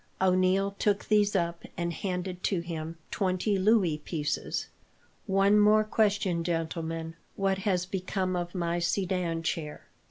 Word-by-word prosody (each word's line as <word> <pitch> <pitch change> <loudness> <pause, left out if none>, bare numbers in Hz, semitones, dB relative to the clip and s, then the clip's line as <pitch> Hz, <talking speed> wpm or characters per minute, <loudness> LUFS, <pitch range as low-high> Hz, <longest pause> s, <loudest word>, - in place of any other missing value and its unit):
O'Neil 185 +1 +3
took 205 -1 +1
these 210 -1 +3
up, 170 0 -1
and 170 0 -1
handed 180 0 -3
to 185 -4 +1
him 165 -1 -5
twenty 190 +1 0
louis 190 -6 +3
pieces. 150 -1 -2 0.6
"One 195 +2 +4
more 210 +1 +5
question, 200 -5 +1
gentlemen. 165 -1 -3 0.2
What 195 -1 0
has 180 -2 +1
become 185 0 -2
of 175 +1 -3
my 170 -1 0
sedan 175 -2 -1
chair?" 155 -2 -3
185 Hz, 130 wpm, -29 LUFS, 170-195 Hz, 0.6 s, more